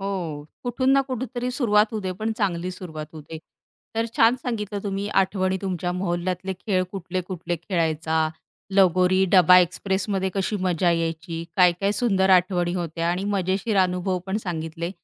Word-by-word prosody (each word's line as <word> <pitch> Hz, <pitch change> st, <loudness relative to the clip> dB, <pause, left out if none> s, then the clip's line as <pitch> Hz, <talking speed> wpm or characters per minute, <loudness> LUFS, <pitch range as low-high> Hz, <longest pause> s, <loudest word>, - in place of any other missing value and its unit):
हो. 175 Hz, -7 st, -4 dB, 0.2 s
कुठून 255 Hz, +2 st, +1 dB
ना 275 Hz, -, +5 dB
कुठेतरी 250 Hz, 0 st, -3 dB
सुरुवात 220 Hz, -5 st, +3 dB
होऊ 215 Hz, -, -2 dB
दे, 185 Hz, -2 st, -3 dB
पण 220 Hz, +4 st, -3 dB
चांगली 185 Hz, -4 st, -1 dB
सुरुवात 160 Hz, -4 st, -7 dB
होऊ 155 Hz, -, -9 dB
दे. 160 Hz, +2 st, -9 dB, 0.6 s
तर 230 Hz, 0 st, +1 dB
छान 230 Hz, +2 st, +5 dB
सांगितलं 210 Hz, -5 st, -3 dB
तुम्ही 200 Hz, 0 st, -2 dB, 0.2 s
आठवणी 190 Hz, 0 st, -1 dB
तुमच्या 180 Hz, -2 st, -2 dB
मोहल्ल्यातले 180 Hz, +1 st, -2 dB
खेळ, 185 Hz, 0 st, -1 dB
कुठले-कुठले 180 Hz, -2 st, -4 dB
खेळायचा, 160 Hz, -3 st, 0 dB, 0.5 s
लगोरी, 185 Hz, 0 st, +4 dB
डबा 180 Hz, -1 st, +8 dB
एक्सप्रेसमध्ये 190 Hz, +2 st, 0 dB
कशी 195 Hz, +2 st, -1 dB
मजा 180 Hz, -1 st, +1 dB
यायची, 165 Hz, 0 st, -2 dB
काय-काय 180 Hz, +2 st, +4 dB
सुंदर 195 Hz, -5 st, +2 dB
आठवणी 175 Hz, -1 st, 0 dB
होत्या 170 Hz, -1 st, -2 dB
आणि 185 Hz, +3 st, -2 dB
मजेशीर 190 Hz, +4 st, 0 dB
अनुभव 180 Hz, 0 st, -1 dB
पण 190 Hz, +2 st, -1 dB
सांगितले. 165 Hz, 0 st, -4 dB
185 Hz, 150 wpm, -24 LUFS, 175-200 Hz, 0.6 s, डबा